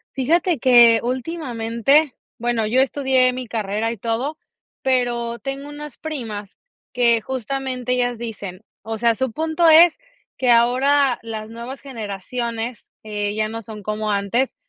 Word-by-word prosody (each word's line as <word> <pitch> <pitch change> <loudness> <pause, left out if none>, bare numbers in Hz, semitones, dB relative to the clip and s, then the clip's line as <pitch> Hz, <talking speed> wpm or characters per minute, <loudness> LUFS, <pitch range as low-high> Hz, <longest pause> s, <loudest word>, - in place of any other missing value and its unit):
Fíjate 330 +6 +2
que 235 -2 +7
últimamente, 255 0 0 0.2
bueno, 240 -1 0
yo 245 +5 +3
estudié 265 -2 +2
mi 255 -1 -6
carrera 215 0 -2
y 235 - -6
todo, 235 - -2 0.4
pero 240 -2 0
tengo 275 +1 -6
unas 295 -2 -9
primas 225 -10 -6 0.4
que 235 -2 +3
justamente 255 +1 -3
ellas 245 -1 0
dicen, 205 -5 -7 0.2
o 225 +1 -5
sea, 235 +1 +3
su 260 +1 -1
punto 320 +5 +2
es 325 +2 +7 0.4
que 255 - +1
ahora 255 +3 +4
las 220 -1 -6
nuevas 235 +4 -8
generaciones, 230 0 -5
eh, 210 -1 -3
ya 215 0 0
no 225 0 -5
son 215 -1 -10
como 215 +1 -3
antes, 205 +6 0
240 Hz, 140 wpm, -21 LUFS, 225-265 Hz, 0.4 s, que